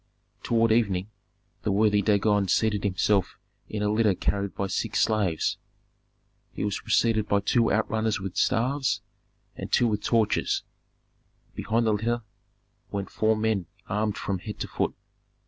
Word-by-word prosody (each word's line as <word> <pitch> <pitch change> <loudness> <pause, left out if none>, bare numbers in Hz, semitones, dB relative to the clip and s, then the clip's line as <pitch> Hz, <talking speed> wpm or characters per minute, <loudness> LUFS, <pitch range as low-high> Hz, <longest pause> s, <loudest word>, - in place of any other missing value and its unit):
Toward 115 -1 +2
evening 105 -3 +1 0.5
the 105 - -1
worthy 105 0 +3
Dagon 105 0 +2
seated 105 +2 +1
himself 100 0 +1 0.3
in 105 -1 -3
a 105 - +1
litter 105 -3 +3
carried 100 +2 -1
by 100 - -1
six 105 +3 -1
slaves. 100 -7 +1 0.9
He - - -5
was 105 - -2
preceded 110 -1 +2
by 100 0 +2
two 115 +3 +2
outrunners 110 0 0
with 95 -1 -6
staffs, 130 +4 +1 0.5
and - - -7
two 120 - +4
with 105 -2 -1
torches; 110 -2 +1 0.9
behind 115 +2 0
the 110 - +3
litter 115 +3 -1 0.7
went 100 -1 -4
four 110 0 +2
men 110 -5 0 0.2
armed 105 0 -1
from 95 -2 -2
head 105 +2 -7
to - - -2
foot. - - -2
105 Hz, 145 wpm, -26 LUFS, 100-110 Hz, 0.9 s, two